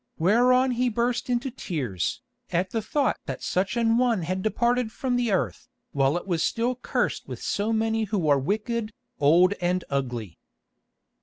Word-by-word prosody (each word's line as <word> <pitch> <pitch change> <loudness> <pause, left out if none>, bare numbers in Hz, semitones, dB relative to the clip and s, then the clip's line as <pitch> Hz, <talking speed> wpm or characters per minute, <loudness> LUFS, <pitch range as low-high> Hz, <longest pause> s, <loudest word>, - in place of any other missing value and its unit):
Whereon 250 +8 +4
he 250 +1 +1
burst 240 +2 -1
into 250 +2 0
tears, 135 - -3 0.3
at 180 +2 0
the 225 - -1
thought 275 +5 0
that - - -5
such 190 +5 0
an 230 0 +3
one 235 -7 +2
had 185 +3 -2
departed 235 +2 +1
from 250 +2 -2
the 240 -3 +1
earth, 195 +5 -1 0.2
while 140 +3 +2
it 175 - -6
was 175 -4 -1
still 235 +7 +1
cursed 250 - -2
with - - -6
so 205 +2 -1
many 225 0 +1
who 195 -6 -1
are 145 -2 +4
wicked, 215 - -2 0.3
old 170 +6 +5
and 180 +1 0
ugly. 120 - -3
215 Hz, 165 wpm, -26 LUFS, 175-240 Hz, 0.3 s, old